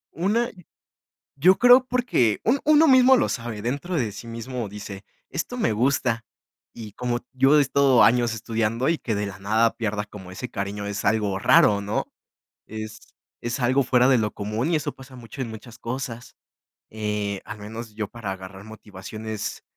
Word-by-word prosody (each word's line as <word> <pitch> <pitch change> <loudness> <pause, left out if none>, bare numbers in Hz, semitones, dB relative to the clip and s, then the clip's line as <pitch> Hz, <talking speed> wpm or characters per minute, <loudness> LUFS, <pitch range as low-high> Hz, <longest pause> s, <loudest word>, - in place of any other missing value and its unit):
Una. 215 +8 0 0.9
Yo 185 +6 +6
creo 250 +1 +7
porque 240 - +1
un 260 +5 +2
uno 310 +1 +6
mismo 260 0 +7
lo - - +1
sabe 115 -4 -4
dentro 140 - -3
de 115 -7 0
sí 105 +4 -10
mismo 115 0 -5
dice: 100 -1 -8 0.2
"Esto 245 - -4
me 115 - +1
gusta". 115 -1 +1 0.5
Y 110 -3 -9
como 120 +1 -2
yo 135 +3 +4
he - - +6
estado 140 -2 +4
años 120 -1 +3
estudiando 115 +2 -1
y 165 - +2
que 115 - -3
de 105 0 -2
la 95 -1 -8
nada 110 +3 +2
pierdas 105 -2 -2
como 95 -3 -11
ese 115 +7 -6
cariño 100 0 -4
es 100 0 -4
algo 100 -2 +1
raro 105 -2 +5
¿no?, 100 +2 -2 0.6
es 110 0 -7 0.4
es 120 +2 -2
algo 130 +2 +2
fuera 125 0 +3
de 130 -3 +5
lo 105 -1 -1
común 110 +9 -2
y 165 - +3
eso 150 - -2
pasa 135 -1 -14
mucho 120 +3 -10
en 120 - -2
muchas 110 +1 -11
cosas, 120 -1 -6 0.5
eh, 105 -2 -3
al 105 0 -8
menos 110 +1 -8
yo 105 -2 -4
para 115 -5 -5
agarrar 95 +1 -10
motivaciones 110 0 -7
115 Hz, 175 wpm, -24 LUFS, 105-130 Hz, 0.9 s, creo